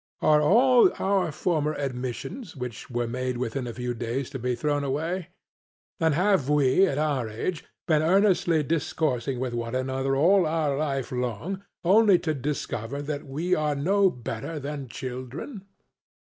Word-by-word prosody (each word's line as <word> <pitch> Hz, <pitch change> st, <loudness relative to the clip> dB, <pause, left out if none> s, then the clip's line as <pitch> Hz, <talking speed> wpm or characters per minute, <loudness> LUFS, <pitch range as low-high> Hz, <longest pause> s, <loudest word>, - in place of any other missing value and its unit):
Are 150 Hz, -1 st, +5 dB
all 245 Hz, -, +5 dB
our 195 Hz, -4 st, +1 dB
former 155 Hz, -2 st, 0 dB
admissions 135 Hz, -, -5 dB
which 125 Hz, -3 st, -7 dB
were 120 Hz, -1 st, -1 dB
made 125 Hz, +1 st, -3 dB
within 125 Hz, +1 st, -3 dB
a 120 Hz, -, -5 dB
few 125 Hz, 0 st, -3 dB
days 120 Hz, +3 st, -3 dB
to 135 Hz, -, -5 dB
be 125 Hz, +1 st, -1 dB
thrown 145 Hz, +3 st, 0 dB
away? 160 Hz, +6 st, -2 dB, 0.7 s
And 160 Hz, -3 st, +2 dB
have 185 Hz, -5 st, +2 dB
we, 150 Hz, +5 st, +4 dB
at 140 Hz, -, -2 dB
our 145 Hz, -6 st, 0 dB
age, 150 Hz, +10 st, -4 dB, 0.2 s
been 155 Hz, -3 st, +3 dB
earnestly 175 Hz, -2 st, +3 dB
discoursing 140 Hz, -4 st, -1 dB
with 125 Hz, -1 st, -2 dB
one 115 Hz, +1 st, -3 dB
another 130 Hz, +1 st, -1 dB
all 175 Hz, +5 st, +4 dB
our 155 Hz, -3 st, 0 dB
life 135 Hz, -3 st, -2 dB
long 125 Hz, -, -3 dB, 0.2 s
only 200 Hz, +1 st, +6 dB
to 160 Hz, -2 st, -2 dB
discover 140 Hz, -2 st, -3 dB
that 145 Hz, -1 st, -4 dB
we 160 Hz, +7 st, -1 dB
are 150 Hz, -3 st, +1 dB
no 190 Hz, +7 st, +3 dB
better 125 Hz, +3 st, -5 dB
than 140 Hz, -1 st, -5 dB
children? 130 Hz, -, -7 dB
145 Hz, 155 wpm, -26 LUFS, 125-170 Hz, 0.7 s, only